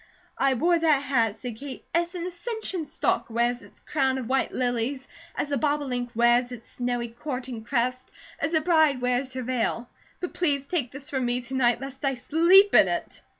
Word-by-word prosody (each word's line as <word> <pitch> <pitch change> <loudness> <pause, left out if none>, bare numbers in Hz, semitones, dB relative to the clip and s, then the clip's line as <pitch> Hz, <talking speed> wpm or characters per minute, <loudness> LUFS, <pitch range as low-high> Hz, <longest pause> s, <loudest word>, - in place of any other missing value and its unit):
"I 275 -1 +3
wore 340 +6 +3
that 305 -4 +3
hat," 230 -6 +1
said 240 -2 -7
Kate, 275 +1 -8
"as 345 +1 0
an 345 -1 -3
ascension 365 -2 -4
stalk - - -1
wears 240 +1 0
its - - -15
crown 265 -3 0
of 255 -3 -4
white 265 +2 +1
lilies, 250 +2 -1 0.3
as 290 - -2
a 280 - +1
bobolink 275 -4 -1
wears 240 +1 +3
its 240 -2 -10
snowy 245 -1 -2
courting 250 -1 -6
crest, 255 +1 0 0.4
as 320 +4 0
a 315 - +3
bride 315 -5 +3
wears 250 +1 0
her 255 0 -4
veil; 245 -1 -1 0.3
but 360 - -5
please 285 -6 0
take 285 -6 -2
this 275 +1 -9
from 260 -3 0
me 245 +1 0
to 245 +2 -9
night, 245 -2 +2
lest 270 +1 -8
I 270 -1 +1
sleep 340 +10 +5
in - - +7
it!" - - -4
265 Hz, 195 wpm, -26 LUFS, 245-300 Hz, 0.4 s, in